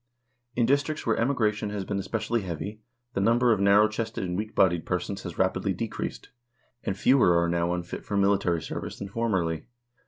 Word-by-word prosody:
In 120 - +3
districts 145 +4 +1
where 115 - +2
emigration 110 -4 +1
has 100 -2 -4
been 100 0 -2
especially 110 +3 -1
heavy, 100 +4 -5 0.3
the 95 - 0
number 120 +4 +4
of 105 - -1
narrow 100 +2 +6
chested 110 0 -3
and 90 -1 -2
weak 105 +3 -4
bodied 85 -3 +3
persons - - -3
has - - -7
rapidly - - +1
decreased, - - -5 0.5
and 95 - -2
fewer 120 -8 +5
are 85 - +2
now 85 0 0
unfit 90 0 -4
for 100 - -2
military 100 -4 +2
service - - -5
than 100 - -6
formerly. 95 -8 -1
100 Hz, 180 wpm, -27 LUFS, 90-115 Hz, 0.5 s, narrow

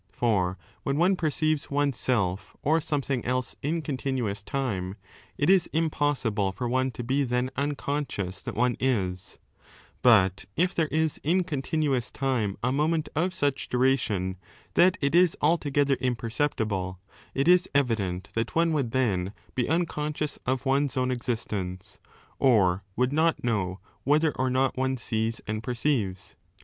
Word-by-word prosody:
^ - - -42
17 100 - -39
For 95 -6 +1 0.2
when 140 +1 -1
one 180 +4 +4
perceives 155 -2 0
one's 145 -2 +1
self 100 -7 -1
or 160 +3 +3
something 140 -5 -1
else 130 0 -1
in 160 +3 -1
continuous 130 -8 -2
time, 100 -7 -3 0.4
it 145 - +1
is 190 -2 +4
impossible 145 -10 0
for 120 +6 -4
one 130 +2 +1
to 120 - -5
be 135 +4 +1
then 125 0 0
unconscious 140 -9 -2
that - - -6
one 125 +1 +2
is; 95 -8 -1 0.6
but 100 -6 +4
if 180 +3 +2
there 165 -2 +1
is 160 0 0
in 180 +5 +2
continuous 140 -5 -1
time 125 -7 -1
a 125 - +2
moment 155 +3 +1
of 175 +5 +1
such 145 -7 -1
duration 120 -8 +1 0.4
that 180 +1 +5
it 140 +1 +1
is 175 0 +4
altogether 145 -3 +2
imperceptible, 110 -7 -1 0.4
it 135 +3 +1
is 180 0 +5
evident 105 -10 0
that 115 0 -2
one 165 0 +3
would 140 -6 0
then 100 -7 0 0.2
be 125 0 -1
unconscious 150 -3 -1
of 130 +1 0
one's 135 0 +1
own 130 0 +1
existence, 105 -5 -4 0.4
or 100 -8 +4
would 125 +2 +1
not 160 +2 +2
know 100 -6 -1 0.2
whether 150 +3 +3
or 130 -1 -1
not 130 +1 +1
one 130 0 0
sees 115 -1 -2
and 110 0 -3
perceives. 115 -6 -1
130 Hz, 150 wpm, -27 LUFS, 110-150 Hz, 0.6 s, that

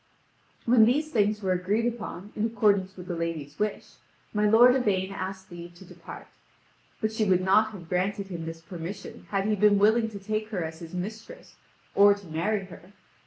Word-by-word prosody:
When 230 -2 +6
these 295 +6 +1
things 210 -3 +1
were 190 - +1
agreed 195 +5 0
upon 215 -4 -5
in 215 +1 0
accordance 200 -4 +1
with 180 - -8
the 175 - -4
lady's 160 -4 -4
wish, 210 0 -3 0.4
my 210 0 +2
lord 240 +4 +7
Yvain 195 -7 0
asked 190 -1 -6
leave 175 0 -10
to 190 - -14
depart. - - -11 0.7
But 215 - -1
she 220 0 0
would 185 -3 +3
not 205 +4 +4
have 175 -5 -10
granted 195 +3 -1
him 165 -3 -5
this 165 0 -7
permission 175 +4 -8
had 195 -1 0
he 215 0 +2
been 205 0 +4
willing 220 +3 +3
to 210 - -8
take 215 +2 -3
her 190 -6 -2
as 160 0 -6
his 165 +1 -9
mistress, 220 - -7 0.4
or 200 0 +6
to 200 -1 -13
marry 190 +5 -1
her. 180 +1 -14
200 Hz, 190 wpm, -27 LUFS, 180-215 Hz, 0.7 s, lord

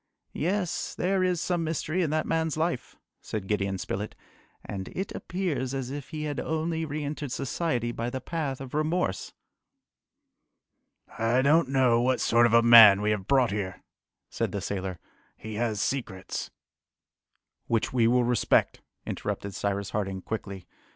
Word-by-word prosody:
"Yes! 180 +2 -1
there 190 +1 +1
is 180 -2 +1
some 175 0 -1
mystery 160 +2 -1
in 165 - +1
that 155 +1 0
man's 160 -1 0
life," 160 -4 -2 0.3
said 105 -3 -5
Gideon 100 -1 -1
Spilett, 100 +3 -4 0.5
"and 95 -2 -5
it 190 +1 -3
appears 165 -8 -2
as 130 -1 -3
if 145 -1 -6
he 155 -2 -5
had 145 -2 -3
only 160 +1 -1
re 150 0 -4
entered 145 -2 -4
society 125 -3 -1
by 115 0 -3
the 130 - -4
path 140 -1 -3
of 135 -2 -8
remorse." 155 - -1 1.9
"I 115 +3 +2
don't 150 0 +4
know 130 -3 +3
what 130 +1 +2
sort 120 +1 +4
of 115 - -2
a 115 - +6
man 110 -4 +9
we 105 - +2
have 100 -2 -2
brought 130 -5 +3
here," 100 -2 -4 0.5
said - - -1
the - - -2
sailor. 95 -2 -4 0.4
"He 110 0 -8
has 110 -3 0
secrets 110 -7 -3 0.6
" - - -53
"Which 115 +1 0
we 120 -3 +4
will 125 +1 +4
respect," 120 -2 +2 0.2
interrupted 100 -1 -4
Cyrus 100 +1 -2
Harding 95 -2 -3
quickly. 100 -4 -5
125 Hz, 160 wpm, -27 LUFS, 105-155 Hz, 1.9 s, man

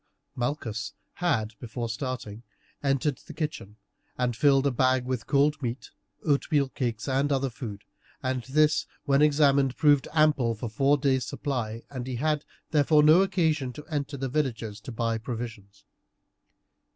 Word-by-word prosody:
Malchus 120 -4 -3 0.2
had, 110 -12 0
before 120 0 -4
starting, 115 -2 -5 0.4
entered 135 0 0
the - - -12
kitchen, 150 - -4 0.4
and 125 -1 +1
had 115 - -14
filled 140 -2 +5
a 140 - +3
bag 130 0 +2
with 130 -2 -3
cold 150 +1 +2
meat, 120 0 -4 0.3
oatmeal 145 -1 +2
cakes, 120 -4 -3
and 135 +2 +1
other 135 -1 +1
food, 110 -5 -7 0.4
and 130 -1 -1
this, 150 +3 +2 0.2
when 140 0 +3
examined, 140 -3 +4
proved 145 -3 +4
ample 150 -7 +3
for 110 +2 -5
four 135 +6 +3
days' 130 -3 +1
supply, 115 -6 -3
and 130 -2 -5
he 130 - -3
had, 150 +3 0 0.3
therefore, 150 0 +4
no 155 +5 +7
occasion 160 -8 +1
to 150 +4 -10
enter 145 -1 -2
the 135 0 -2
villages 120 -7 -2
to 125 - -8
buy 115 0 -1
provisions. 110 - -7
135 Hz, 150 wpm, -27 LUFS, 120-145 Hz, 0.4 s, no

